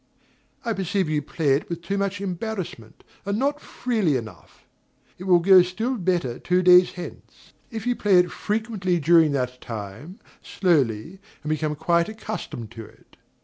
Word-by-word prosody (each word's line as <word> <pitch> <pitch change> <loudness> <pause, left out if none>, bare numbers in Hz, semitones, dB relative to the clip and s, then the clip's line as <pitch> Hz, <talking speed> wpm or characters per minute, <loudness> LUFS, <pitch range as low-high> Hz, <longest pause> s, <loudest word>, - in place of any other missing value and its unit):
I 230 - 0
perceive 190 -2 -1
you 150 -1 0
play 155 +1 -2
it 140 - -1
with 170 -1 -5
too 195 +4 -2
much 200 0 -2
embarrassment, 185 - -5 0.2
and 200 +1 -2
not 285 +4 0
freely 215 - 0
enough. 110 -3 -11 0.5
It 185 - -7
will 180 -2 +6
go 185 +2 +7
still 220 +9 -2
better 175 - -1
two 180 +1 +1
days 180 0 +6
hence, 180 -1 -11 0.2
if 225 -2 -6
you 245 0 +1
play 200 -5 +3
it 180 0 +3
frequently 210 -5 -1
during 160 0 +5
that 125 -2 -2
time, 115 - -8 0.2
slowly, 160 - 0 0.2
and 150 - -4
become 155 -1 -1
quite 170 +3 +1
accustomed 185 - -6
to 115 -1 -8
it. - - -19
180 Hz, 160 wpm, -24 LUFS, 150-200 Hz, 0.5 s, go